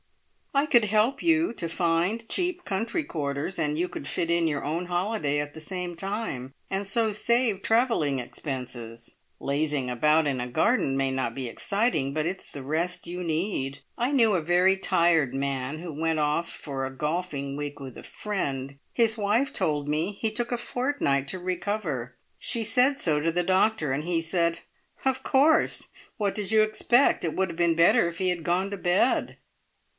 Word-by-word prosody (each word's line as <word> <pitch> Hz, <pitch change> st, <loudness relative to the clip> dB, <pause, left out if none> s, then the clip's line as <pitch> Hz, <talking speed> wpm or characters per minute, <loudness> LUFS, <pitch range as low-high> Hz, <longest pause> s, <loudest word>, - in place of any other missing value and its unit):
I 280 Hz, +1 st, +3 dB
could 240 Hz, -7 st, +4 dB
help 220 Hz, +7 st, +2 dB
you 325 Hz, -3 st, +3 dB
to 170 Hz, -7 st, -2 dB
find 175 Hz, +7 st, 0 dB
cheap 360 Hz, +3 st, -1 dB
country 225 Hz, -, -1 dB
quarters, 150 Hz, -, -3 dB
and 150 Hz, -1 st, 0 dB
you 175 Hz, +2 st, 0 dB
could -, -, -7 dB
fit 170 Hz, 0 st, -1 dB
in 170 Hz, -1 st, +2 dB
your 145 Hz, -2 st, -2 dB
own 165 Hz, +4 st, -2 dB
holiday 175 Hz, -5 st, 0 dB
at 145 Hz, 0 st, -4 dB
the 160 Hz, -, -9 dB
same 180 Hz, +1 st, -5 dB
time, 195 Hz, -, -4 dB, 0.2 s
and 195 Hz, +1 st, -1 dB
so 220 Hz, +1 st, +2 dB
save 225 Hz, -1 st, +1 dB
travelling 225 Hz, -, +2 dB
expenses. 120 Hz, -3 st, -6 dB, 0.2 s
Lazing 140 Hz, -2 st, -1 dB
about 150 Hz, +5 st, +3 dB
in 130 Hz, -3 st, -1 dB
a 125 Hz, -, -4 dB
garden 155 Hz, -, +2 dB
may 135 Hz, -1 st, +1 dB
not 130 Hz, -3 st, -2 dB
be 130 Hz, -2 st, -3 dB
exciting, 200 Hz, -, 0 dB
but 155 Hz, 0 st, -1 dB
it's 185 Hz, +3 st, -4 dB
the 140 Hz, -, -6 dB
rest 170 Hz, +6 st, -2 dB
you 180 Hz, +1 st, -4 dB
need. 155 Hz, -5 st, -2 dB, 0.2 s
I 245 Hz, +4 st, 0 dB
knew 230 Hz, -7 st, +5 dB
a 180 Hz, -, +2 dB
very 180 Hz, +4 st, +4 dB
tired 165 Hz, -7 st, +2 dB
man 135 Hz, +1 st, -2 dB
who 165 Hz, -3 st, -7 dB
went 165 Hz, -1 st, +1 dB
off 150 Hz, +3 st, 0 dB
for 135 Hz, -3 st, -5 dB
a 130 Hz, -, -2 dB
golfing 150 Hz, -1 st, -3 dB
week 145 Hz, 0 st, -5 dB
with 130 Hz, -3 st, -8 dB
a -, -, -10 dB
friend. 140 Hz, -10 st, -4 dB
His 230 Hz, -1 st, +2 dB
wife 215 Hz, +7 st, +1 dB
told 145 Hz, -2 st, 0 dB
me 155 Hz, +7 st, 0 dB
he 220 Hz, +2 st, -1 dB
took 240 Hz, +3 st, -2 dB
a 245 Hz, -, +1 dB
fortnight 240 Hz, -, -1 dB
to 185 Hz, -, -4 dB
recover. 175 Hz, -, -3 dB, 0.2 s
She 230 Hz, -, +1 dB
said 260 Hz, +5 st, +3 dB
so 155 Hz, -, +2 dB
to 165 Hz, +2 st, +1 dB
the 175 Hz, +2 st, 0 dB
doctor, 185 Hz, -5 st, +2 dB
and 145 Hz, +3 st, -2 dB
he 170 Hz, 0 st, 0 dB
said, 170 Hz, 0 st, 0 dB, 0.4 s
`Of 265 Hz, -1 st, +2 dB
course! 305 Hz, +4 st, +3 dB, 0.3 s
What 205 Hz, -3 st, -1 dB
did 210 Hz, -2 st, -2 dB
you 220 Hz, -1 st, +6 dB
expect? 240 Hz, +5 st, +3 dB
It 165 Hz, -3 st, -2 dB
would 190 Hz, -1 st, 0 dB
have 165 Hz, -, -7 dB
been 170 Hz, -1 st, +3 dB
better 170 Hz, +1 st, +5 dB
if 170 Hz, 0 st, -6 dB
he 185 Hz, 0 st, 0 dB
had 175 Hz, -2 st, -2 dB
gone 185 Hz, +4 st, 0 dB
to 200 Hz, -, -3 dB
bed.'" 180 Hz, +7 st, +1 dB
170 Hz, 185 wpm, -26 LUFS, 145-215 Hz, 0.4 s, you